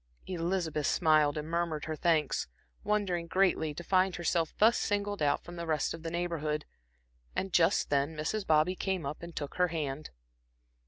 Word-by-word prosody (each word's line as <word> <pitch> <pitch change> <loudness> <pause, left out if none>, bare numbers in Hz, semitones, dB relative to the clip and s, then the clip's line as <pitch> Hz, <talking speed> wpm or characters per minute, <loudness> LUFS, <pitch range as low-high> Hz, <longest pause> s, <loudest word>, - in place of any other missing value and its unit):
Elizabeth 170 -4 -1
smiled 155 -3 +3
and 150 0 -4
murmured 170 -2 -1
her 155 - -3
thanks, 155 - +1 0.4
wondering 190 -5 0
greatly 180 -4 +2
to 150 +4 -7
find 185 0 +2
herself 170 -1 0
thus 225 +3 +5
singled 205 -1 -1
out 145 -1 +2
from 175 0 -10
the 170 0 -5
rest 155 -2 0
of 165 - -8
the 165 - -4
Neighborhood; 165 -3 -2 0.7
and 190 -1 -2
just 165 -3 +3
then 145 +2 +1
Mrs. 195 +8 -1
Bobby 155 +3 +4
came 190 -4 -2
up 140 +2 -5
and 170 -1 -9
took 145 -2 -5
her 180 0 +4
hand. 155 -3 -4
165 Hz, 170 wpm, -31 LUFS, 155-180 Hz, 0.7 s, thus